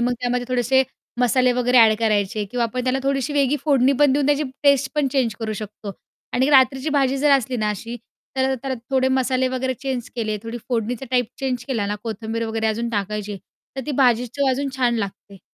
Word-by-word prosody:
मग 245 +1 +1
त्यामध्ये 245 0 -1
थोडेसे 255 +1 +3 0.4
मसाले 250 +1 +3
वगैरे 250 0 +3
अ‍ॅड 220 -2 +7
करायचे 210 -2 0
किंवा 245 0 0
आपण 245 +2 -3
त्याला 260 +1 +1
थोडीशी 275 +1 -1
वेगळी 285 0 +2
फोडणी 275 -3 +4
पण 290 -2 +5
देऊन 280 0 +1
त्याची 290 +1 +2 0.2
टेस्ट 280 -1 +3
पण 295 -2 +1
चेंज 250 -6 +1
करू 220 -1 -2
शकतो 210 -1 -7 0.4
आणि 260 +3 +2
रात्रीची 265 +1 +4
भाजी 270 0 +1
जर 295 +2 +3
असली 255 -1 -3
ना 215 -2 0
अशी, 230 +4 -5 0.4
तर 265 0 +1
त्याला 265 +1 -4 0.2
थोडे 260 -1 +2
मसाले 260 0 +1
वगैरे 260 0 -2
चेंज 255 -2 -4
केले, 215 -2 -1
थोडी 230 +1 -6
फोडणीचा 245 +1 -2
टाईप 250 -2 +2
चेंज 255 -3 -2
केला 225 -6 -1
ना 205 - -2
कोथिंबीर 225 0 -4
वगैरे 220 0 -1
अजून 225 +2 -1
टाकायची 210 -1 -3 0.4
तर - - -2
ती - - -2
भाजी 245 -1 +3
चव 280 +3 -1
अजून 275 +2 -1
छान 245 -2 +2
लागते. 200 -1 -6
250 Hz, 200 wpm, -22 LUFS, 225-265 Hz, 0.4 s, अ‍ॅड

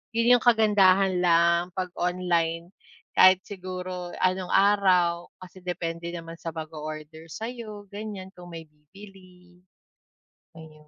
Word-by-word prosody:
yun 235 +2 +5
yung - - -11
kagandahan 195 -5 +4
lang 170 0 +4
'pag 185 -2 -3
online, 175 -1 -1 0.4
kahit 185 0 +7
siguro 185 -2 -6
anong 185 0 0
araw 185 -4 +3
kasi 185 0 -13
depende 170 -1 -4
naman 165 -1 -8
sa 165 - -5
mag-o-order 155 0 -8
sa'yo, 220 -3 -7
ganyan 200 -2 -7
kung 175 -1 -12
may 165 -1 -8
bibili. 180 +3 -17 1.0
Ayun. 155 -1 -14
180 Hz, 115 wpm, -26 LUFS, 170-195 Hz, 1.0 s, kahit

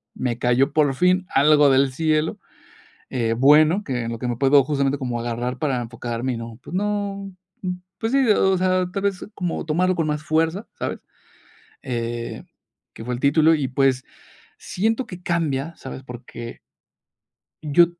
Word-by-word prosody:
me 120 -2 -2
cayó, 130 +4 +2
por 145 -3 +3
fin, 180 +3 +2
algo 145 +1 +5
del 135 0 +3
cielo, 155 +1 0 0.7
eh, 115 -3 0
bueno, 155 +8 +5
que 125 -6 -2
en 115 - -4
lo 115 - -5
que 125 - -3
me 120 -1 -2
puedo, 140 +1 +5
justamente, 140 0 0
como 125 -3 -3
agarrar 120 +2 -3
para 135 -5 0
enfocarme 120 +1 -4
y - - -4
no, 115 -1 -8
pues, - - -10
no, 200 -1 -2 0.7
pues, 225 +2 -2
sí, 275 -1 +4
o 190 -2 +4
sea, 185 0 +1
tal 195 +1 -3
vez, 200 -1 -1
como 175 -4 -3
tomarlo 180 +4 +1
con 165 -2 0
más 150 0 -2
fuerza", 165 +6 0
¿sabes?, - - -3 0.8
eh, 120 -2 -4 0.5
que - - -9
fue 125 - -2
el - - -6
título 160 +3 +4
y, 140 -4 -1
pues, 130 0 +1 0.5
siento 225 +6 -1
que 180 -1 -10
cambia, 165 -2 -1
¿sabes?, 130 0 -8
porque 120 -2 -9 1.0
yo 155 +3 +5
145 Hz, 165 wpm, -22 LUFS, 125-175 Hz, 1.0 s, algo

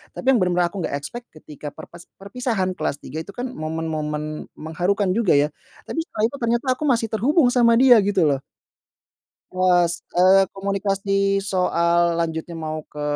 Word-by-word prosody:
tapi - - -7
yang 245 - +3
bener-bener 180 -2 +1
aku 195 - -6
nggak - - -3
expect, 235 +12 -6
ketika 150 -1 -10
perpes 170 +4 -11
perpisahan 200 -2 -2
kelas - - -1
3 155 +5 -6
itu, 195 +5 -9
kan, 250 +1 -4
momen-momen 155 -4 -4
mengharukan 180 +5 -1
juga, 205 -5 +2
ya, 145 +1 +2 0.3
tapi 325 - -5
setelah 320 -9 -4
itu 280 - -7
ternyata 235 +2 -1
aku 305 - -1
masih 230 -4 +1
terhubung 250 - +3
sama 235 -2 +4
dia, 245 -1 +7
gitu, 195 -2 +1
loh. 140 -3 +2 1.1
Pas, 180 -2 +3 0.2
eee, 190 +2 +5
komunikasi 195 0 0
soal 170 -3 +1
lanjutnya 160 +1 -4
mau 155 0 -3
ke 150 - -9
190 Hz, 160 wpm, -22 LUFS, 160-225 Hz, 1.1 s, dia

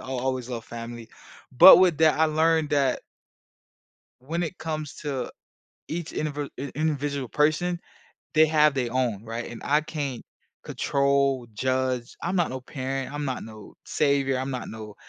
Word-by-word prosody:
I'll 130 -1 -5
always 130 -1 -2
love 115 -2 -5
family. 115 -1 -8 0.5
But 190 - +11
with 180 -5 +4
that, 155 -1 +4
I 160 - +5
learned 160 0 +2
that 140 -3 +2 1.2
when 165 +7 -3
it 170 +2 -5
comes 155 -2 -4
to 135 -4 -3 0.6
each 170 0 -4
indivd 145 -2 -3
in 140 +1 -5
individual 145 -3 -1
person, 155 +6 +1 0.6
they 155 0 +6
have 150 -1 +4
their 125 -3 -2
own, 120 -5 -1
right? 115 +1 -5
And 120 - -9
I 150 +2 +3
can't 145 -5 -5 0.4
control, 140 -2 +1
judge. 130 0 -1
I'm 175 +3 -1
not 175 -2 +1
no 130 0 -5
parent, 135 +1 -4
I'm 145 0 -3
not 130 -3 -3
no 110 -2 -12
savior, 140 -2 +1
I'm 130 +1 -3
not 125 -4 -5
no 110 -2 -9
140 Hz, 160 wpm, -25 LUFS, 125-155 Hz, 1.2 s, But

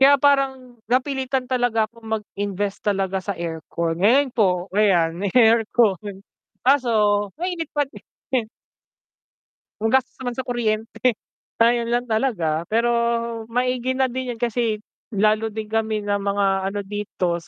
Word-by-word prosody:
Kaya 280 +1 +7
parang, 265 -3 +1
napilitan 265 0 0
talaga 245 -3 +1
ako 230 +2 -12
mag-invest 205 -3 -3
talaga 195 -2 0
sa 200 0 -4
aircon, 165 0 -3
ngayon 255 +6 +4
po 180 -6 +2
ayan 190 -5 +3
may 200 - 0
aircon, 220 -4 +3 0.4
kaso 260 -2 +4 0.5
mainit 340 -2 -3
pa 290 - +3
din. 270 - -14 1.8
Ang 225 +2 0
gastos 265 0 +2
naman 245 -1 -3
sa - - -2
kuryente. 230 +1 0 0.5
Ayun 235 0 +3
lang 245 +1 +1
talaga, 185 -9 0
pero 230 +2 +2 0.6
maigi 250 +1 0
na 265 0 +2
din 255 0 -3
yun 225 - -20
kasi 230 -2 0 0.3
lalo 215 +2 +2
din 215 0 -5
kami 220 -1 0
ng 205 0 0
mga 200 0 0 0.2
ano 205 +1 -3
dito 195 -4 -2
225 Hz, 135 wpm, -22 LUFS, 205-255 Hz, 1.8 s, Kaya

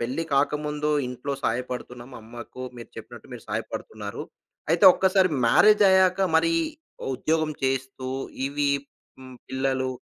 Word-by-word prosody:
పెళ్లి 130 +8 -2
కాకముందు 150 +1 0 0.2
ఇంట్లో 125 +3 -5
సహాయపడుతున్నాం, 125 +1 -4
అమ్మకు 120 +3 -10 0.2
మీరు 115 - -11
చెప్పినట్టు - - -11
మీరు - - -11
సహాయపడుతున్నారు. 105 -2 -5 0.5
అయితే 170 +3 +3
ఒక్కసారి 190 -1 +3 0.2
మ్యారేజ్ 210 - +5
అయ్యాక 190 0 +4 0.2
మరి, 330 - +2 0.6
ఉద్యోగం 155 +3 0
చేస్తూ 130 0 -2 0.4
ఇవి 145 0 0 0.5
హ్మ్, 130 -1 -12
పిల్లలు, 130 0 -1
135 Hz, 115 wpm, -25 LUFS, 125-160 Hz, 0.6 s, మ్యారేజ్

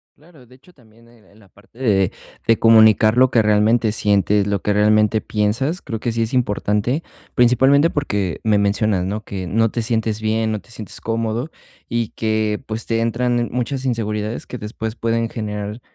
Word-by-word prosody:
Claro, 150 -4 -20
de 125 - -18
hecho, 155 +7 -22
también 115 -3 -23
en 115 -3 -23
en 100 +3 -22
la 100 - -20
parte 100 +4 -24
de 100 -7 +1 0.4
de 115 - +4
comunicar 110 0 +5
lo 130 0 +5
que 115 -3 +3
realmente 110 +2 +3
sientes, 105 -1 +1
lo 100 -2 -1
que 105 - +1
realmente 105 +1 +3
piensas, 115 +11 -1
creo 110 -2 -5
que 120 - -2
sí 115 0 0
es 110 - -4
importante, 120 +3 0 0.3
principalmente 135 +6 +4
porque 100 - -2
me 110 -2 +3
mencionas, 100 -2 +1
¿no?, 105 +3 -3
que 95 -2 -6
no 115 +5 +1
te 115 +2 -3
sientes 110 -2 -1
bien, 110 0 0
no 110 - -2
te 110 - -18
sientes 110 -3 -8
cómodo 115 +5 -2 0.4
y 115 -2 -2
que, 110 0 -1
pues, 110 -1 -5
te 115 -1 0
entran 120 +1 0
muchas 130 +2 -3
inseguridades 110 -2 -3
que 125 - -6
después 110 0 -6
pueden 115 0 -1
generar, 105 0 -5
110 Hz, 185 wpm, -20 LUFS, 105-120 Hz, 0.4 s, comunicar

